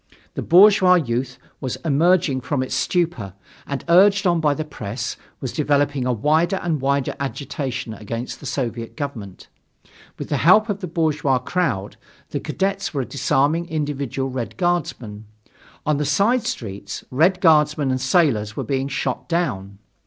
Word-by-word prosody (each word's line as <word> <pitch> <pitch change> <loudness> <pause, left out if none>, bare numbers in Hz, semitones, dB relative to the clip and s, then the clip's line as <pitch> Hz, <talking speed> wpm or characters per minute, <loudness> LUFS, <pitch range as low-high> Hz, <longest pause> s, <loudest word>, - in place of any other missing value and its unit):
The - - -4
bourgeois 190 0 +6
youth 125 -5 -1 0.2
was 130 -2 -4
emerging 160 -2 +2
from 130 +1 -1
its 130 - -5
stupor 160 - -1 0.3
and, 140 -1 -4
urged 195 +4 +5
on 175 -2 +3
by 150 -2 +2
the 155 - -4
press, 115 -4 -5 0.2
was 130 - -5
developing 145 -3 +1
a - - +2
wider 155 - +2
and 160 -5 -1
wider 140 0 0
agitation 135 -3 -4
against 115 +3 -6
the 140 - -8
Soviet 115 -3 -4
government. 115 - -6 0.7
With - - -7
the - - 0
help 215 - +5
of 200 -1 -2
the 185 - -5
bourgeois 150 -5 +1
crowd, 125 - -2 0.3
the - - -2
cadets 195 -2 -2
were 135 -2 -1
disarming 145 +5 +1
individual 140 -4 -3
Red 125 -3 -5
Guardsmen. 140 - -2 0.6
On 150 -1 +1
the 150 - -1
side 200 - +2
streets 100 -3 -5
Red 170 +8 +3
Guardsmen 150 -5 +3
and 130 0 -1
sailors 130 - +2
were - - -2
being 135 -1 -1
shot 140 - -3
down. 100 - -2
145 Hz, 150 wpm, -21 LUFS, 125-170 Hz, 0.7 s, bourgeois